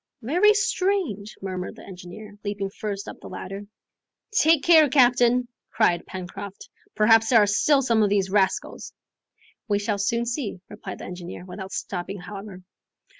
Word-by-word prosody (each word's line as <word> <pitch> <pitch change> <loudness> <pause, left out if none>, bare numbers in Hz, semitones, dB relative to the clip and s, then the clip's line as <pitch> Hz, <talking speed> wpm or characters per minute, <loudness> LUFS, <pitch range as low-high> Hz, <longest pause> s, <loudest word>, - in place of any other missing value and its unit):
"Very 360 - +4
strange!" 370 - -1
murmured 185 -1 -4
the - - -13
engineer, 190 +3 -10
leaping 200 -1 -3
first 200 -1 -5
up - - -8
the - - -11
ladder. 195 +2 -7 0.6
"Take 320 -7 +4
care, 320 -4 +6
captain!" 245 -2 +4 0.2
cried 175 -6 +1
Pencroft, 190 +2 -8 0.3
"perhaps 225 +1 +5
there 245 - +6
are 210 - +6
still 275 +7 +3
some 230 -3 +2
of 210 - +3
these 195 -2 +1
rascals. 195 -2 0 0.7
"We 205 -2 +2
shall 205 0 -2
soon 235 +4 0
see," 235 -5 -3
replied 205 -2 -8
the - - -9
engineer, 180 0 -8
without 190 +1 -8
stopping 190 +1 -4
however. 195 0 -9
205 Hz, 150 wpm, -24 LUFS, 195-245 Hz, 0.7 s, care